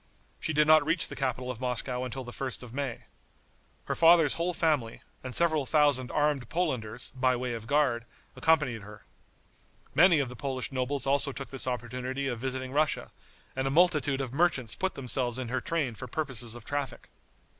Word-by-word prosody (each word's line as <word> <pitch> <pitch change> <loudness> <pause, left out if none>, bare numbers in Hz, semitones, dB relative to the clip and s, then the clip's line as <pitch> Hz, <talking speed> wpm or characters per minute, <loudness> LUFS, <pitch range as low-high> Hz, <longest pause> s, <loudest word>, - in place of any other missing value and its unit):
She - - -1
did 150 0 +4
not 155 0 +6
reach 165 +3 +2
the - - -7
capital 130 -1 -2
of 120 -1 -9
Moscow 125 0 -2
until 130 +1 -5
the 120 - -8
1st 130 0 -4
of 120 -2 -10
May. 135 -3 -3 0.8
Her - - -2
father's 165 -3 +6
whole 170 +2 0
family, 150 -10 0 0.2
and 130 -1 -5
several 160 -5 +3
thousand 145 -5 +3
armed 145 -5 0
Polanders, 125 -9 -2
by 130 -1 +2
way 125 0 -3
of 115 -1 -7
guard, 135 -5 +2 0.3
accompanied 150 -8 +2
her. 105 +1 -12 0.9
Many 170 -1 +6
of 140 - 0
the 125 - -9
Polish 130 0 -3
nobles 130 +1 -2
also 140 +1 +2
took 140 0 -7
this 135 -1 -2
opportunity 125 +2 -3
of 120 -3 -3
visiting 130 0 -3
Russia, 150 +2 0 0.4
and 130 0 -1
a - - +1
multitude 150 -3 +3
of 130 -2 -5
merchants 140 -7 +1
put 190 0 -2
themselves 125 -2 -2
in 130 -2 -4
her 130 +2 -1
train 155 -8 -1
for 125 +3 -8
purposes 125 -4 -3
of 120 - -11
traffic. 145 -3 -4
130 Hz, 185 wpm, -29 LUFS, 125-150 Hz, 0.9 s, not